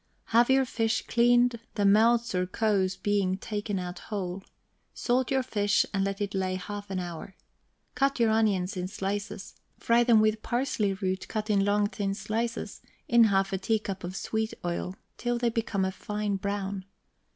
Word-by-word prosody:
Have 235 Hz, +2 st, +5 dB
your 265 Hz, 0 st, +4 dB
fish 225 Hz, -2 st, -1 dB
cleaned, 240 Hz, 0 st, +3 dB, 0.2 s
the 205 Hz, -, +1 dB
melts 230 Hz, +3 st, +4 dB
or 180 Hz, 0 st, 0 dB
kows 195 Hz, -2 st, +1 dB
being 200 Hz, -2 st, +1 dB
taken 205 Hz, 0 st, -3 dB
out 180 Hz, 0 st, -5 dB
whole; 190 Hz, -3 st, -3 dB, 0.5 s
salt 255 Hz, +1 st, +1 dB
your 265 Hz, -1 st, +1 dB
fish, 205 Hz, -5 st, +2 dB
and 195 Hz, -1 st, +1 dB
let 195 Hz, +1 st, -2 dB
it 200 Hz, -1 st, -2 dB
lay 190 Hz, -1 st, -1 dB
half 205 Hz, +2 st, -6 dB
an 190 Hz, -, -3 dB
hour. 175 Hz, +1 st, -7 dB, 0.6 s
Cut 275 Hz, -1 st, +1 dB
your 230 Hz, -2 st, +4 dB
onions 205 Hz, -4 st, +1 dB
in 180 Hz, 0 st, -3 dB
slices, 195 Hz, 0 st, -4 dB, 0.2 s
fry 235 Hz, +1 st, +3 dB
them 235 Hz, -2 st, +5 dB
with 215 Hz, 0 st, +2 dB
parsley 240 Hz, -5 st, 0 dB
root, 190 Hz, -1 st, -3 dB
cut 215 Hz, 0 st, -2 dB
in 200 Hz, -1 st, +3 dB
long 205 Hz, +1 st, +2 dB
thin 200 Hz, -1 st, -2 dB
slices, 225 Hz, +4 st, -3 dB, 0.3 s
in 235 Hz, -4 st, +6 dB
half 195 Hz, -1 st, +2 dB
a 190 Hz, -, 0 dB
teacup 205 Hz, -1 st, -2 dB
of 180 Hz, +2 st, -5 dB
sweet 220 Hz, +2 st, -2 dB
oil, 175 Hz, +1 st, -3 dB, 0.2 s
till 240 Hz, 0 st, -1 dB
they 240 Hz, 0 st, +1 dB
become 225 Hz, -4 st, -1 dB
a 190 Hz, -, -1 dB
fine 210 Hz, 0 st, -3 dB
brown. 200 Hz, 0 st, -3 dB
205 Hz, 175 wpm, -28 LUFS, 195-230 Hz, 0.6 s, in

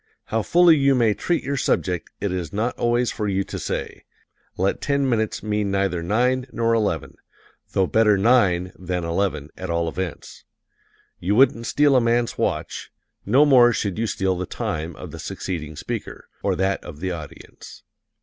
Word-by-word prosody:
How 115 Hz, -, -1 dB
fully 170 Hz, +6 st, +5 dB
you 140 Hz, -1 st, +3 dB
may 115 Hz, -4 st, +3 dB
treat 175 Hz, -, -1 dB
your 140 Hz, +2 st, -2 dB
subject 90 Hz, -8 st, -1 dB
it 100 Hz, -1 st, -2 dB
is 90 Hz, -4 st, -3 dB
not 115 Hz, +4 st, -1 dB
always 120 Hz, +1 st, +1 dB
for 105 Hz, -2 st, -3 dB
you 95 Hz, -1 st, 0 dB
to -, -, -7 dB
say. -, -, -4 dB, 0.5 s
Let 95 Hz, +2 st, 0 dB
ten 140 Hz, -1 st, +1 dB
minutes 110 Hz, -4 st, -1 dB
mean 105 Hz, -1 st, -1 dB
neither 95 Hz, -3 st, 0 dB
nine 125 Hz, +8 st, +1 dB
nor 115 Hz, 0 st, +1 dB
eleven 110 Hz, -3 st, -1 dB, 0.6 s
though 95 Hz, -, +3 dB
better 105 Hz, +1 st, +3 dB
nine 95 Hz, -5 st, +3 dB
than 90 Hz, -1 st, -3 dB
eleven, 85 Hz, -3 st, -2 dB
at 95 Hz, -1 st, -6 dB
all 85 Hz, 0 st, 0 dB
events. 90 Hz, 0 st, -6 dB, 0.8 s
You 95 Hz, +4 st, 0 dB
wouldn't 115 Hz, -2 st, +4 dB
steal 145 Hz, -2 st, +3 dB
a 130 Hz, -, +5 dB
man's 120 Hz, 0 st, +1 dB
watch; -, -, -3 dB, 0.4 s
no 130 Hz, +8 st, +5 dB
more 125 Hz, -4 st, +6 dB
should 100 Hz, -3 st, -2 dB
you 115 Hz, -, 0 dB
steal 95 Hz, -2 st, 0 dB
the 90 Hz, 0 st, -4 dB
time 80 Hz, +1 st, -4 dB
of -, -, -9 dB
the -, -, -9 dB
succeeding 80 Hz, -4 st, -5 dB
speaker, -, -, -6 dB
or -, -, 0 dB
that 95 Hz, +1 st, 0 dB
of 75 Hz, 0 st, -10 dB
the 95 Hz, +2 st, -2 dB
audience. 80 Hz, -4 st, -10 dB
105 Hz, 175 wpm, -23 LUFS, 90-120 Hz, 0.8 s, more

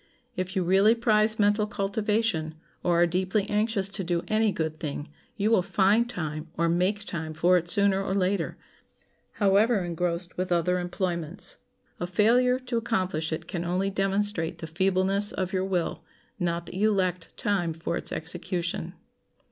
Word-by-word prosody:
If 185 Hz, +2 st, -3 dB
you 190 Hz, -, +1 dB
really 195 Hz, +5 st, +5 dB
prize 220 Hz, -2 st, +2 dB
mental 210 Hz, 0 st, +3 dB
cultivation, 205 Hz, -5 st, -1 dB, 0.3 s
or 175 Hz, -1 st, +2 dB
are -, -, +6 dB
deeply 190 Hz, +4 st, 0 dB
anxious 210 Hz, -2 st, 0 dB
to 195 Hz, 0 st, -5 dB
do 170 Hz, -1 st, -1 dB
any 215 Hz, 0 st, +2 dB
good 160 Hz, -3 st, -2 dB
thing, 145 Hz, -1 st, -5 dB, 0.3 s
you 210 Hz, +2 st, +1 dB
will 225 Hz, -, +5 dB
find 200 Hz, +5 st, +2 dB
time 155 Hz, -6 st, -4 dB
or 170 Hz, +1 st, +2 dB
make 185 Hz, +5 st, +1 dB
time 160 Hz, -4 st, -4 dB
for 175 Hz, +3 st, +4 dB
it 175 Hz, -1 st, 0 dB
sooner 200 Hz, 0 st, +3 dB
or 190 Hz, 0 st, -2 dB
later, 195 Hz, +1 st, 0 dB, 0.8 s
however, 205 Hz, +1 st, +3 dB
engrossed 175 Hz, +1 st, -2 dB
with 185 Hz, 0 st, -2 dB
other 175 Hz, +1 st, +2 dB
employments. 175 Hz, -1 st, -2 dB, 0.4 s
A 175 Hz, -, -2 dB
failure 240 Hz, +7 st, +3 dB
to 250 Hz, -2 st, -2 dB
accomplish 185 Hz, -9 st, -1 dB
it 160 Hz, -, -4 dB
can 175 Hz, -2 st, -3 dB
only 185 Hz, +3 st, 0 dB
demonstrate 195 Hz, -3 st, -1 dB
the -, -, -6 dB
feebleness 190 Hz, +4 st, +1 dB
of 185 Hz, 0 st, -3 dB
your 190 Hz, 0 st, 0 dB
will, 175 Hz, -3 st, -2 dB, 0.4 s
not 170 Hz, -1 st, -1 dB
that -, -, -10 dB
you 215 Hz, +3 st, +3 dB
lacked 185 Hz, -4 st, -1 dB
time 185 Hz, -5 st, 0 dB
for 165 Hz, +1 st, -3 dB
its -, -, -2 dB
execution. 175 Hz, +1 st, -3 dB
185 Hz, 165 wpm, -27 LUFS, 170-205 Hz, 0.8 s, are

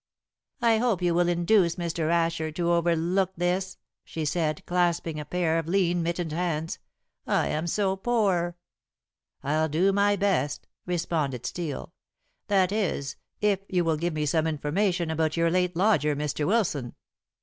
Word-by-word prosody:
"I 225 Hz, -2 st, +4 dB
hope 225 Hz, -7 st, +1 dB
you 175 Hz, -1 st, +2 dB
will 175 Hz, +1 st, +2 dB
induce 175 Hz, 0 st, +3 dB
Mr. 170 Hz, -2 st, -2 dB
Asher 165 Hz, -2 st, +1 dB
to 170 Hz, +1 st, 0 dB
overlook 170 Hz, +2 st, +1 dB
this," 180 Hz, +2 st, -1 dB, 0.3 s
she 160 Hz, -1 st, -5 dB
said, 155 Hz, 0 st, -1 dB
clasping 170 Hz, -3 st, 0 dB
a 150 Hz, -, -5 dB
pair 165 Hz, 0 st, 0 dB
of 165 Hz, -, -5 dB
lean, 175 Hz, -1 st, +2 dB
mittened 170 Hz, -1 st, -2 dB
hands; 165 Hz, -1 st, -2 dB, 0.5 s
"I -, -, +1 dB
am 155 Hz, +3 st, -2 dB
so 195 Hz, +2 st, +1 dB
poor." 195 Hz, -6 st, 0 dB, 0.9 s
"I'll 155 Hz, +3 st, +1 dB
do 180 Hz, +6 st, +2 dB
my 205 Hz, +1 st, +3 dB
best," 185 Hz, -8 st, 0 dB, 0.2 s
responded 155 Hz, -8 st, -1 dB
Steel; 165 Hz, +2 st, -4 dB, 0.5 s
"that 195 Hz, -3 st, +3 dB
is, 170 Hz, -10 st, -1 dB, 0.3 s
if 205 Hz, -2 st, +2 dB
you 180 Hz, -2 st, +1 dB
will 160 Hz, -2 st, +1 dB
give 170 Hz, +2 st, -1 dB
me 150 Hz, 0 st, 0 dB
some 160 Hz, +2 st, +1 dB
information 170 Hz, +3 st, 0 dB
about 160 Hz, 0 st, 0 dB
your 165 Hz, 0 st, +2 dB
late 180 Hz, 0 st, +1 dB
lodger, 165 Hz, -6 st, +2 dB
Mr. 150 Hz, 0 st, -2 dB
Wilson." 175 Hz, -, 0 dB
170 Hz, 150 wpm, -27 LUFS, 160-185 Hz, 0.9 s, I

